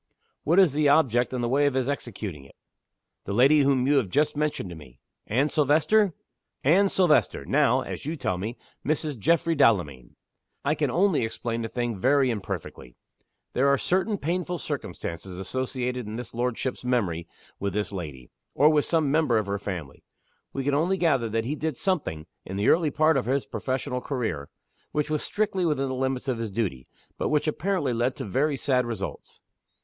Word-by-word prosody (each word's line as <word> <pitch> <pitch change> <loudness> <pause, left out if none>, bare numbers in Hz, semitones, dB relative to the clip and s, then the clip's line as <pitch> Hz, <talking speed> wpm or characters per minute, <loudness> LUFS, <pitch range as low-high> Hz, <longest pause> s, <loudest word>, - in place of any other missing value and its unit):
"What 165 +4 +2
is 185 -8 +6
the 150 0 +3
object 125 -5 +3
in 125 -1 -2
the 120 - 0
way 140 +4 +3
of 140 - -1
his 130 -1 +1
executing 105 - -4
it?" 70 - -18 0.7
"The 100 - -3
lady 140 +6 +6
whom 135 -2 +3
you 145 +1 +4
have 120 -8 +1
just 150 +11 +1
mentioned 150 -11 -2
to - - -7
me." 65 -6 -14 0.3
"Anne 135 +7 +2
Silvester!" 160 +7 +3 0.5
"Anne 190 +8 +4
Silvester 175 -6 +2
now 135 -3 +3
(as - - -6
you 155 +4 -3
tell 95 - -2
me) 110 +6 -4 0.3
Mrs. 150 0 -1
Geoffrey 165 +7 +2
Delamayn. 85 - +1 0.5
I - - +3
can - - 0
only 185 -6 +2
explain 115 +1 -3
the 115 - -2
thing 120 -3 -3
very 135 +2 +3
imperfectly. 95 - -6 0.6
There 135 +2 +2
are 140 0 +4
certain 190 - 0
painful 180 +2 -2
circumstances 90 - -5
associated 125 +3 -3
in 110 +1 -5
his 125 - -7
lordship's 125 +2 -2
memory 100 -10 0 0.3
with 100 -1 -2
this 105 0 -2
lady, 75 -10 -7 0.2
or 150 +2 +6
with 150 -2 +3
some 160 -4 +1
member 150 -6 +3
of 110 - 0
her 100 0 -2
family. 90 -9 -6 0.5
We 135 - -3
can 140 +1 0
only 170 +7 +2
gather 135 -10 +2
that 115 +1 -1
he 135 - -1
did 155 -3 -3
something 145 - -1 0.2
in 95 - -7
the 100 +2 +2
early 165 -2 +4
part 155 +1 +3
of 125 - -1
his 135 +1 +1
professional 130 -1 -3
career 110 - -3 0.4
which 150 0 -1
was 155 - 0
strictly 205 -3 -1
within 140 -5 0
the - - -2
limits 130 +1 -2
of 125 -3 -1
his 115 -1 -3
duty, 95 - -3 0.3
but - - 0
which 150 0 +1
apparently 160 -4 0
led 120 +2 0
to - - -5
very 140 +8 0
sad 125 -3 +1
results. 110 -5 -6
130 Hz, 185 wpm, -26 LUFS, 110-150 Hz, 0.7 s, is